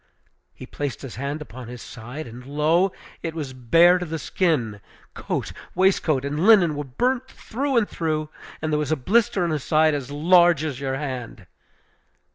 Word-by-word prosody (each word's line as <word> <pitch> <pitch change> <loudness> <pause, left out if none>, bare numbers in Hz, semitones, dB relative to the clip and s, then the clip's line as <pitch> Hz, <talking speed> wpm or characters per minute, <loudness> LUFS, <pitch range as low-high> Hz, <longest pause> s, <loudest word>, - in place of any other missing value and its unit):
He - - -9
placed 145 -3 -5
his 130 -5 -8
hand 140 +3 -3
upon 125 -2 -10
his 125 0 -8
side, 125 +7 -8
and, 120 +1 -10
lo! 155 +7 +2 0.3
it 165 -1 -4
was 145 -5 -5
bare 165 +9 +5
to 180 - -3
the 160 +1 -3
skin! 130 - -1 0.3
Coat, - - -4 0.2
waistcoat, 160 -7 +2
and 145 +2 -2
linen 190 -8 +6
were 145 - -3
burnt 245 - -1
through 265 +1 -3
and 220 -3 +3
through, 155 -2 -2 0.3
and 155 -1 -1
there 150 - +2
was 150 0 -2
a - - +4
blister 195 - +2
on 170 - 0
his 150 -4 -2
side 155 0 +3
as 140 -3 -3
large 170 +2 +4
as 145 -5 -3
your 135 -1 -2
hand! 130 -7 -6
150 Hz, 180 wpm, -23 LUFS, 130-175 Hz, 0.3 s, linen